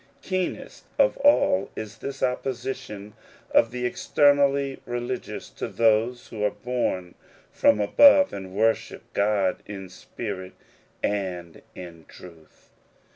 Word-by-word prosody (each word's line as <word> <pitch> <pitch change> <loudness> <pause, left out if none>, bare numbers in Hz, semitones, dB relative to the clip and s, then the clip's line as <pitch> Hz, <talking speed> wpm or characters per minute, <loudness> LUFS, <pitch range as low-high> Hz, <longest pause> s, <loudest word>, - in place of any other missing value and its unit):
Keenest 185 -1 -4
of - - +4
all 190 - +3
is 110 -2 -7
this 140 0 -6
opposition 125 -5 -3 0.4
of 115 - +4
the 125 +1 -4
externally 140 +1 +2
religious, 120 +1 -4
to - - -5
those 115 +2 +1
who 105 -2 -5
are 105 - +3
bom 105 -8 -3 0.4
from - - +3
above 280 - +6
and 95 -1 -7
worship 110 +2 0
God 100 -2 +1
in 95 -2 -8
spirit 95 0 -7 0.5
and 90 -5 -3
in 85 -3 -10
truth. 85 -3 -16
110 Hz, 115 wpm, -25 LUFS, 95-130 Hz, 0.5 s, above